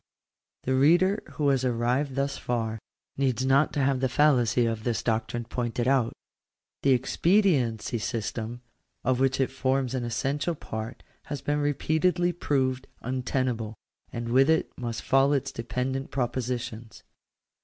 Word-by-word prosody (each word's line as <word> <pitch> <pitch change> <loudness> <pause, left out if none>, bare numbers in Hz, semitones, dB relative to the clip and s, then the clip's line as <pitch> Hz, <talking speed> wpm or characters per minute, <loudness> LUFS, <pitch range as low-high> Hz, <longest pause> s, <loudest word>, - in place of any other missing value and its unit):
The 130 - 0
reader 175 +9 +4
who 145 -3 +1
has 135 -2 +2
arrived 125 +3 0
thus 140 0 0
far, 115 -2 -2 0.4
needs 130 -2 +1
not 135 +3 +4
to 145 - 0
have 135 -1 +2
the 130 0 +1
fallacy 125 -4 +3
of 115 -1 -2
this 120 -1 -1
doctrine 115 +1 -1
pointed 120 0 -2
out. 130 -4 +3 0.7
The 135 - +4
expediency 130 - +2
system, 115 +2 -4 0.4
of 130 0 +1
which 135 0 +2
it 135 - +1
forms 130 -1 0
an 130 -2 -1
essential 135 +8 -1
part, 110 -3 -6 0.2
has 145 -2 -5
been 145 +1 0
repeatedly 160 +5 +1
proved 130 -5 0
untenable, 125 -3 -2 0.4
and 115 -1 -4
with 135 +4 +4
it 160 0 +2
must 120 -2 -4
fall 135 +2 +4
its 135 -1 0
dependent 125 +3 -3
propositions. 120 -3 -3
130 Hz, 140 wpm, -27 LUFS, 120-140 Hz, 0.7 s, reader